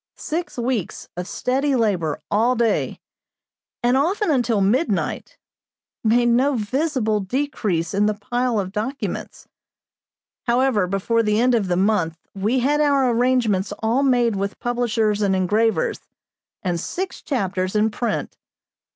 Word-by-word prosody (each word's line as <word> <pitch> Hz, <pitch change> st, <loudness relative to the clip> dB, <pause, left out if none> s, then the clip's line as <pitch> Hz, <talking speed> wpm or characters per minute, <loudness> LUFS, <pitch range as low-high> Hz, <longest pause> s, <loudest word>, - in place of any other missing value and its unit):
Six 330 Hz, -1 st, -4 dB
weeks 240 Hz, -5 st, -3 dB
of 180 Hz, +1 st, -5 dB
steady 270 Hz, +5 st, 0 dB
labor 185 Hz, -, 0 dB
all 230 Hz, +5 st, +3 dB
day, 230 Hz, -2 st, 0 dB, 0.8 s
and 245 Hz, +1 st, +3 dB
often 350 Hz, +7 st, +1 dB
until 240 Hz, -6 st, +2 dB
midnight, 225 Hz, -, 0 dB, 0.7 s
made 240 Hz, +2 st, +3 dB
no 260 Hz, +4 st, +3 dB
visible 240 Hz, -1 st, 0 dB
decrease 205 Hz, -, -2 dB
in 205 Hz, +1 st, +2 dB
the 215 Hz, -, 0 dB
pile 240 Hz, +2 st, -1 dB
of 190 Hz, -2 st, -3 dB
documents. 230 Hz, +7 st, -4 dB, 1.0 s
However, 240 Hz, -5 st, +2 dB
before 195 Hz, +5 st, +1 dB
the 210 Hz, -1 st, +1 dB
end 250 Hz, +1 st, +3 dB
of 220 Hz, -5 st, +1 dB
the 175 Hz, -1 st, 0 dB
month 185 Hz, -5 st, +1 dB, 0.2 s
we 215 Hz, +6 st, 0 dB
had 295 Hz, +4 st, +2 dB
our 280 Hz, -4 st, +3 dB
arrangements 230 Hz, -5 st, +1 dB
all 230 Hz, +5 st, +2 dB
made 245 Hz, -5 st, +2 dB
with 200 Hz, +1 st, -3 dB
publishers 230 Hz, -3 st, 0 dB
and 195 Hz, -2 st, +2 dB
engravers, 220 Hz, -, +1 dB, 0.6 s
and 175 Hz, -3 st, -1 dB
six 370 Hz, -, -4 dB
chapters 190 Hz, -, -2 dB
in 215 Hz, +1 st, +2 dB
print. 225 Hz, 0 st, -3 dB
230 Hz, 135 wpm, -22 LUFS, 205-255 Hz, 1.0 s, all